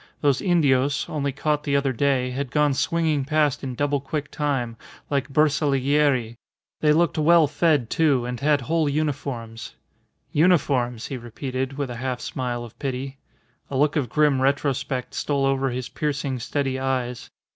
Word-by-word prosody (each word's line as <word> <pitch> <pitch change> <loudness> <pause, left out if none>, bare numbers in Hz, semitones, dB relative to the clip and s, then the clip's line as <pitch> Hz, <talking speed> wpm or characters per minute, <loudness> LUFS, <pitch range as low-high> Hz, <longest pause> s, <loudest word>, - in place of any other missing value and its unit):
Those 140 -3 +2
Indios, 145 -6 +2
only 140 -2 -2
caught 150 +2 -1
the 140 -2 0
other 140 -1 +1
day, 130 0 +1
had 135 +1 -3
gone 150 +2 +2
swinging 160 0 +1
past 150 0 +1
in 130 -2 -4
double 145 +1 0
quick 145 +1 -4
time, 135 -6 -1 0.4
like 140 0 0
bersaglieri; 140 -4 +2 0.4
they 150 - +3
looked 165 +1 +2
well 165 +1 +6
fed, 150 -3 +1
too, 145 -7 +2
and 125 -1 -4
had 145 +1 +2
whole 160 +3 +1
uniforms. 135 -6 -3 0.6
"Uniforms!" 140 -8 +2
he 135 - -5
repeated 130 +3 -4
with 140 -3 -3
a 120 - -6
half 130 -1 -2
smile 125 -2 -3
of 115 - -12
pity. 135 0 -4 0.5
A 135 - -2
look 145 +1 +2
of 140 -6 0
grim 145 -1 +2
retrospect 135 -2 -1
stole 140 -2 0
over 135 0 +1
his 125 0 -4
piercing, 140 -3 -2
steady 135 +2 -2
eyes. 125 -2 -2
140 Hz, 155 wpm, -24 LUFS, 130-150 Hz, 0.6 s, well